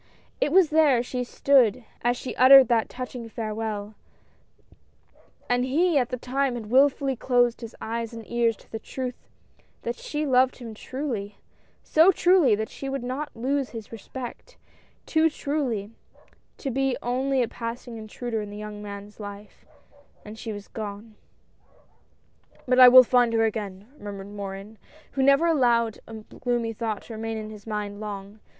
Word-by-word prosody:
It 295 Hz, -, +1 dB
was 355 Hz, -2 st, +5 dB
there 295 Hz, -6 st, +4 dB
she 250 Hz, 0 st, -3 dB
stood 250 Hz, -2 st, +3 dB, 0.2 s
as 245 Hz, +1 st, +1 dB
she 255 Hz, -, -6 dB
uttered 265 Hz, +1 st, +8 dB
that 230 Hz, -2 st, +2 dB
touching 250 Hz, -2 st, -7 dB
farewell 215 Hz, -2 st, -4 dB, 0.7 s
— -, -, -32 dB
and 245 Hz, 0 st, +1 dB
he 305 Hz, +4 st, +2 dB
at 245 Hz, -, -1 dB
the 250 Hz, -, -3 dB
time 260 Hz, +1 st, -1 dB
had 220 Hz, -2 st, -7 dB
wilfully 270 Hz, 0 st, +3 dB
closed 245 Hz, -1 st, +1 dB
his 230 Hz, -1 st, -8 dB
eyes 230 Hz, 0 st, -4 dB
and 230 Hz, -1 st, -9 dB
ears 235 Hz, -2 st, +1 dB
to -, -, -22 dB
the 225 Hz, -, -4 dB
truth 250 Hz, +2 st, -6 dB, 0.5 s
that 235 Hz, -, -2 dB
she 300 Hz, +4 st, -4 dB
loved 260 Hz, -1 st, +3 dB
him 235 Hz, -3 st, -8 dB
truly 225 Hz, -4 st, -5 dB, 0.2 s
— -, -, -36 dB
so 325 Hz, +5 st, +5 dB
truly, 355 Hz, -, +4 dB
that 220 Hz, +1 st, -4 dB
she 275 Hz, -, -6 dB
would 270 Hz, -2 st, -3 dB
not 260 Hz, +4 st, -4 dB
lose 265 Hz, +3 st, -1 dB
his 225 Hz, -3 st, -9 dB
respect 245 Hz, -, -9 dB, 0.2 s
— -, -, -36 dB
too 320 Hz, 0 st, +3 dB
truly 265 Hz, -9 st, -2 dB, 0.7 s
to 270 Hz, -, -4 dB
be 270 Hz, +1 st, 0 dB
only 260 Hz, +2 st, +1 dB
a -, -, -1 dB
passing 230 Hz, +1 st, -6 dB
intruder 220 Hz, +1 st, -4 dB
in 210 Hz, -, -7 dB
the 205 Hz, -, -8 dB
young 210 Hz, 0 st, -7 dB
man's 205 Hz, 0 st, -9 dB
life, 205 Hz, 0 st, -10 dB, 0.6 s
and 210 Hz, +1 st, -9 dB
she 225 Hz, -, -5 dB
was 205 Hz, -1 st, -8 dB
gone! 215 Hz, 0 st, -7 dB, 0.8 s
" -, -, -33 dB
But 255 Hz, 0 st, +3 dB
I 255 Hz, -, +11 dB
will 255 Hz, +1 st, +10 dB
find 245 Hz, -1 st, +3 dB
her 225 Hz, 0 st, +3 dB
again! 205 Hz, -2 st, -4 dB
" 295 Hz, -, -23 dB
murmured 200 Hz, -1 st, -7 dB
Morin, 200 Hz, +1 st, -7 dB, 0.3 s
who 270 Hz, -, -2 dB
never 275 Hz, +4 st, +5 dB
allowed 240 Hz, -8 st, +2 dB
a 225 Hz, -, -9 dB
gloomy 230 Hz, +1 st, -3 dB
thought 220 Hz, -2 st, -3 dB
to 230 Hz, -, -10 dB
remain 225 Hz, 0 st, -4 dB
in 215 Hz, 0 st, -6 dB
his 210 Hz, 0 st, -12 dB
mind 205 Hz, -1 st, -4 dB
long. 205 Hz, 0 st, -7 dB
235 Hz, 170 wpm, -25 LUFS, 215-260 Hz, 0.8 s, I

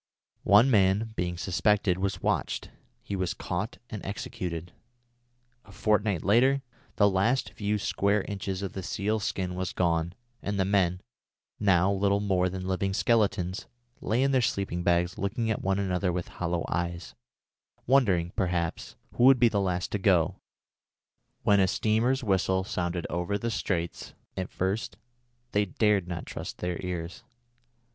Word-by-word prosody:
One 115 Hz, +7 st, +6 dB
man, 105 Hz, +1 st, +3 dB
being 90 Hz, -2 st, -2 dB
suspected, 95 Hz, +2 st, +1 dB
was 100 Hz, +1 st, -2 dB
watched. -, -, -1 dB, 0.3 s
He 100 Hz, -, -4 dB
was 95 Hz, -2 st, -1 dB
caught 95 Hz, +6 st, -4 dB
and 105 Hz, -4 st, -6 dB
executed. 90 Hz, -4 st, -5 dB, 0.9 s
A 100 Hz, -, -16 dB
fortnight 105 Hz, -3 st, +1 dB
later, 130 Hz, +7 st, +4 dB, 0.3 s
the 100 Hz, -, +5 dB
last 100 Hz, +7 st, +1 dB
few 105 Hz, 0 st, -1 dB
square 100 Hz, 0 st, +1 dB
inches 95 Hz, -2 st, -4 dB
of 100 Hz, -, -4 dB
the 95 Hz, -, -4 dB
seal's 105 Hz, +3 st, -1 dB
skin 90 Hz, -2 st, -2 dB
was 90 Hz, 0 st, -3 dB
gone, 85 Hz, -1 st, 0 dB, 0.3 s
and 100 Hz, 0 st, -2 dB
the 95 Hz, -, +3 dB
men, 95 Hz, -2 st, +1 dB, 0.6 s
now 95 Hz, -2 st, +3 dB
little 100 Hz, +1 st, +2 dB
more 95 Hz, -3 st, +1 dB
than 95 Hz, 0 st, -5 dB
living 95 Hz, +1 st, -1 dB
skeletons, 100 Hz, -6 st, +1 dB, 0.3 s
lay 120 Hz, +5 st, +1 dB
in 135 Hz, -, +2 dB
their 130 Hz, -2 st, +3 dB
sleeping 95 Hz, -6 st, -1 dB
bags 85 Hz, +1 st, +1 dB
looking 110 Hz, +4 st, -1 dB
at 110 Hz, -, -2 dB
one 95 Hz, 0 st, +1 dB
another 90 Hz, -2 st, 0 dB
with 90 Hz, 0 st, -3 dB
hollow 85 Hz, -1 st, -2 dB
eyes, 85 Hz, -1 st, -3 dB, 0.7 s
wondering, 100 Hz, -10 st, +3 dB
perhaps, 85 Hz, -3 st, -2 dB, 0.2 s
who 120 Hz, -, +3 dB
would 135 Hz, 0 st, +8 dB
be 120 Hz, -, +6 dB
the 100 Hz, -2 st, 0 dB
last 90 Hz, -2 st, -1 dB
to 105 Hz, -, -1 dB
go, 90 Hz, -3 st, +3 dB, 1.1 s
when 100 Hz, -1 st, +4 dB
a 95 Hz, -, +4 dB
steamer's 115 Hz, +7 st, +1 dB
whistle 95 Hz, -2 st, +1 dB
sounded 85 Hz, -2 st, -2 dB
over 90 Hz, +4 st, -1 dB
the 115 Hz, +3 st, -3 dB
straits. 85 Hz, -6 st, -3 dB, 0.2 s
At 95 Hz, -1 st, -3 dB
first 95 Hz, +4 st, -2 dB, 0.5 s
they 105 Hz, 0 st, +2 dB
dared 100 Hz, -1 st, +1 dB
not 85 Hz, -1 st, -5 dB
trust -, -, -7 dB
their 90 Hz, -1 st, -3 dB
ears. 90 Hz, -1 st, -5 dB
95 Hz, 150 wpm, -28 LUFS, 90-105 Hz, 1.1 s, would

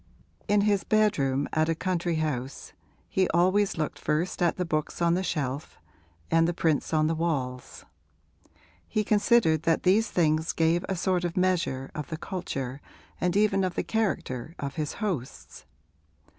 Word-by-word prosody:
In 205 Hz, 0 st, +3 dB
his 205 Hz, -1 st, +2 dB
bedroom 145 Hz, -11 st, +2 dB
at 160 Hz, +1 st, +2 dB
a 165 Hz, -, +1 dB
country 175 Hz, -1 st, -1 dB
house 140 Hz, -5 st, -3 dB, 0.3 s
he 190 Hz, -1 st, +1 dB
always 185 Hz, +3 st, +3 dB
looked 155 Hz, -1 st, -2 dB
first 165 Hz, +5 st, -1 dB
at 175 Hz, -1 st, +3 dB
the 180 Hz, -, -1 dB
books 155 Hz, -2 st, -2 dB
on 170 Hz, -1 st, +3 dB
the 180 Hz, -, +1 dB
shelf 145 Hz, -5 st, -3 dB, 0.5 s
and 165 Hz, 0 st, +4 dB
the 175 Hz, -, -1 dB
prints 160 Hz, -4 st, 0 dB
on 155 Hz, -1 st, +3 dB
the 160 Hz, -, +1 dB
walls; 140 Hz, -7 st, -3 dB, 1.0 s
he 215 Hz, -, 0 dB
considered 205 Hz, -6 st, +3 dB
that 165 Hz, 0 st, +1 dB
these 210 Hz, +4 st, +3 dB
things 160 Hz, -1 st, +1 dB
gave 165 Hz, +2 st, +2 dB
a 190 Hz, -, 0 dB
sort 180 Hz, 0 st, 0 dB
of 175 Hz, 0 st, -3 dB
measure 170 Hz, -8 st, 0 dB
of 150 Hz, -, -5 dB
the 160 Hz, -, -4 dB
culture 140 Hz, -7 st, -5 dB, 0.4 s
and 180 Hz, +2 st, +1 dB
even 205 Hz, -2 st, +3 dB
of 185 Hz, -2 st, -1 dB
the -, -, -1 dB
character 165 Hz, -, -2 dB
of 140 Hz, -1 st, -4 dB
his 155 Hz, -2 st, -3 dB
hosts. 145 Hz, -, -5 dB
165 Hz, 160 wpm, -27 LUFS, 150-185 Hz, 1.0 s, and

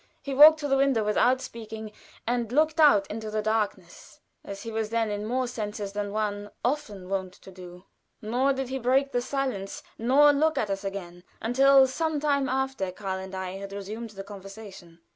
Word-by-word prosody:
He 275 Hz, -, -4 dB
walked 305 Hz, +3 st, +9 dB
to 290 Hz, -, -2 dB
the 270 Hz, -1 st, +2 dB
window 270 Hz, -5 st, +2 dB
without 245 Hz, +5 st, +2 dB
speaking, 220 Hz, -2 st, -8 dB, 0.3 s
and 240 Hz, -1 st, -1 dB
looked 310 Hz, +4 st, +2 dB
out 245 Hz, -11 st, +6 dB
into 220 Hz, +1 st, -6 dB
the 215 Hz, 0 st, -2 dB
darkness 210 Hz, -5 st, -3 dB, 0.2 s
as 200 Hz, 0 st, -8 dB
he 230 Hz, -, -6 dB
was 220 Hz, -1 st, -2 dB
then 225 Hz, -1 st, 0 dB
in 205 Hz, +1 st, -3 dB
more 255 Hz, +2 st, 0 dB
senses 210 Hz, -4 st, -5 dB
than 205 Hz, -1 st, -3 dB
one 205 Hz, -1 st, -2 dB, 0.2 s
often 235 Hz, -9 st, -2 dB
wont 190 Hz, -1 st, -3 dB
to 190 Hz, -, -14 dB
do 180 Hz, 0 st, -12 dB, 0.3 s
nor 245 Hz, +6 st, +1 dB
did 265 Hz, -1 st, -3 dB
he 265 Hz, 0 st, -3 dB
break 265 Hz, +3 st, +2 dB
the 245 Hz, -, 0 dB
silence 255 Hz, -7 st, -3 dB, 0.2 s
nor 280 Hz, +6 st, +5 dB
look 315 Hz, +2 st, +1 dB
at 210 Hz, -, 0 dB
us 195 Hz, 0 st, -3 dB
again 180 Hz, -3 st, -6 dB, 0.2 s
until 270 Hz, +3 st, +5 dB
some 310 Hz, +3 st, -1 dB
time 280 Hz, -2 st, +1 dB
after 265 Hz, -7 st, -1 dB
Karl 190 Hz, 0 st, -4 dB
and 190 Hz, 0 st, -8 dB
I 190 Hz, 0 st, -5 dB
had 200 Hz, 0 st, -8 dB
resumed 215 Hz, +4 st, -6 dB
the 195 Hz, -2 st, -8 dB
conversation. 195 Hz, -4 st, -11 dB
220 Hz, 190 wpm, -27 LUFS, 200-265 Hz, 0.3 s, walked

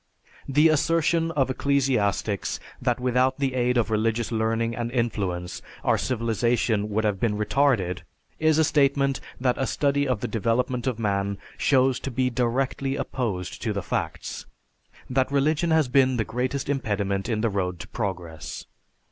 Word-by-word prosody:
The 150 Hz, +4 st, +5 dB
assertion 165 Hz, +1 st, +2 dB
of 135 Hz, -3 st, +1 dB
ecclesiastics 125 Hz, -8 st, 0 dB, 0.2 s
that 125 Hz, -1 st, +1 dB
without 125 Hz, +1 st, +2 dB
the 135 Hz, -2 st, 0 dB
aid 125 Hz, -1 st, +1 dB
of 115 Hz, -1 st, +1 dB
religious 115 Hz, +2 st, 0 dB
learning 115 Hz, +1 st, 0 dB
and 120 Hz, -1 st, -3 dB
influence 100 Hz, -8 st, -2 dB, 0.2 s
our -, -, +2 dB
civilization 115 Hz, -2 st, 0 dB
would 110 Hz, +1 st, 0 dB
have 105 Hz, -3 st, 0 dB
been 105 Hz, -2 st, 0 dB
retarded 105 Hz, -5 st, +1 dB, 0.4 s
is 155 Hz, -1 st, +3 dB
a 160 Hz, -, +5 dB
statement 140 Hz, -2 st, +2 dB, 0.2 s
that 125 Hz, 0 st, +1 dB
a 135 Hz, -, 0 dB
study 140 Hz, 0 st, +1 dB
of 125 Hz, -5 st, 0 dB
the -, -, -1 dB
development 120 Hz, +3 st, 0 dB
of 125 Hz, -4 st, 0 dB
man 100 Hz, -2 st, -1 dB, 0.2 s
shows 130 Hz, -2 st, +3 dB
to -, -, -4 dB
be 125 Hz, 0 st, 0 dB
directly 130 Hz, +3 st, 0 dB
opposed 105 Hz, -11 st, -3 dB
to -, -, -1 dB
the -, -, -3 dB
facts; -, -, -4 dB, 0.6 s
that 130 Hz, +1 st, +1 dB
religion 155 Hz, +4 st, +2 dB
has 160 Hz, -3 st, +3 dB
been 130 Hz, 0 st, +3 dB
the 110 Hz, -, 0 dB
greatest 125 Hz, +4 st, -2 dB
impediment 100 Hz, -7 st, -1 dB
in 110 Hz, -2 st, 0 dB
the 115 Hz, -, +2 dB
road 90 Hz, -3 st, -2 dB
to -, -, -8 dB
progress. 90 Hz, -7 st, -5 dB
125 Hz, 155 wpm, -25 LUFS, 110-135 Hz, 0.6 s, The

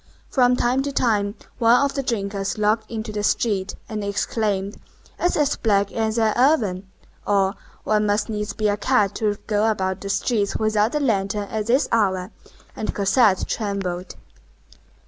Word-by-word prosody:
From 250 Hz, -2 st, +4 dB
time 250 Hz, +2 st, +1 dB
to 280 Hz, +1 st, -3 dB
time 210 Hz, -6 st, +1 dB, 0.2 s
one 235 Hz, +1 st, +5 dB
of 280 Hz, 0 st, +1 dB
the 275 Hz, -, -1 dB
drinkers 200 Hz, -6 st, -2 dB
looked 215 Hz, +1 st, +1 dB
into 220 Hz, -1 st, -5 dB
the 210 Hz, 0 st, -3 dB
street, 205 Hz, -2 st, 0 dB
and 215 Hz, -2 st, -4 dB
exclaimed, 200 Hz, -1 st, -1 dB, 0.4 s
"It's 350 Hz, -, +1 dB
as 295 Hz, -2 st, +2 dB
black 200 Hz, -3 st, +1 dB
as 220 Hz, 0 st, -1 dB
an 220 Hz, -2 st, +2 dB
oven!" 215 Hz, -9 st, +2 dB, 0.4 s
or, 195 Hz, -1 st, +2 dB, 0.3 s
"One 210 Hz, -1 st, +1 dB
must 205 Hz, +1 st, +1 dB
needs 210 Hz, -1 st, -3 dB
be 215 Hz, 0 st, 0 dB
a 205 Hz, 0 st, +1 dB
cat 210 Hz, -3 st, +2 dB
to 210 Hz, -2 st, 0 dB
go 215 Hz, +1 st, +1 dB
about 190 Hz, -3 st, -1 dB
the 200 Hz, -, -5 dB
streets 200 Hz, +1 st, 0 dB
without 215 Hz, +2 st, +1 dB
a -, -, +2 dB
lantern 210 Hz, -6 st, 0 dB
at 215 Hz, -1 st, -3 dB
this 260 Hz, +4 st, +3 dB
hour!" 190 Hz, -5 st, +1 dB, 0.4 s
And 215 Hz, -, -4 dB
Cosette 200 Hz, 0 st, +3 dB
trembled. 195 Hz, -4 st, -3 dB
210 Hz, 165 wpm, -22 LUFS, 200-230 Hz, 0.4 s, one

